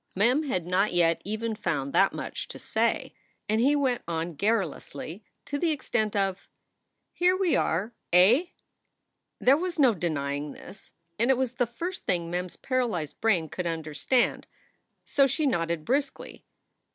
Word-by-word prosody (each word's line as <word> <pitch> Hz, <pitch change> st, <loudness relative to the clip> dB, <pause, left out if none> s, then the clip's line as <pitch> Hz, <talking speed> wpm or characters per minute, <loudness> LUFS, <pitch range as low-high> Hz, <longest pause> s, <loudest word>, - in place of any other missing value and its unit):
Mem 240 Hz, +9 st, +3 dB
had 220 Hz, -, -2 dB
not 185 Hz, +3 st, +1 dB
yet 170 Hz, -1 st, +3 dB
even 220 Hz, +2 st, -3 dB
found 145 Hz, -10 st, -2 dB
that 195 Hz, -, +4 dB
much -, -, -5 dB
to -, -, -8 dB
say. -, -, -1 dB, 0.3 s
And 215 Hz, +2 st, +2 dB
he 280 Hz, +4 st, +4 dB
went 260 Hz, -4 st, +1 dB
on 165 Hz, 0 st, -2 dB
garrulously 190 Hz, -1 st, -2 dB, 0.2 s
to 285 Hz, -, -3 dB
the 340 Hz, -, +1 dB
extent 240 Hz, -8 st, -1 dB
of: 195 Hz, -2 st, +1 dB
4 -, -, -27 dB, 0.7 s
Here 360 Hz, +1 st, +3 dB
we 375 Hz, -3 st, +2 dB
are, 200 Hz, +8 st, 0 dB, 0.2 s
eh?" 200 Hz, -, +6 dB, 0.9 s
There 265 Hz, +3 st, +5 dB
was 360 Hz, +1 st, -3 dB
no 265 Hz, -6 st, +5 dB
denying 145 Hz, -5 st, -2 dB
this, 195 Hz, -, -12 dB, 0.2 s
and 235 Hz, +3 st, +2 dB
it 265 Hz, -, +4 dB
was 255 Hz, -2 st, -1 dB
the 245 Hz, -1 st, 0 dB
first 340 Hz, +11 st, -6 dB
thing 170 Hz, -2 st, 0 dB
Mem 180 Hz, +1 st, -1 dB
s 180 Hz, -, -11 dB
paralyzed 235 Hz, -, -2 dB
brain 190 Hz, -8 st, +2 dB
could 180 Hz, +3 st, -4 dB
understand, 165 Hz, -, 0 dB, 0.6 s
so 275 Hz, -1 st, +3 dB
she 285 Hz, +4 st, 0 dB
nodded 170 Hz, -, 0 dB
briskly. 275 Hz, +2 st, -2 dB
210 Hz, 160 wpm, -27 LUFS, 170-260 Hz, 0.9 s, eh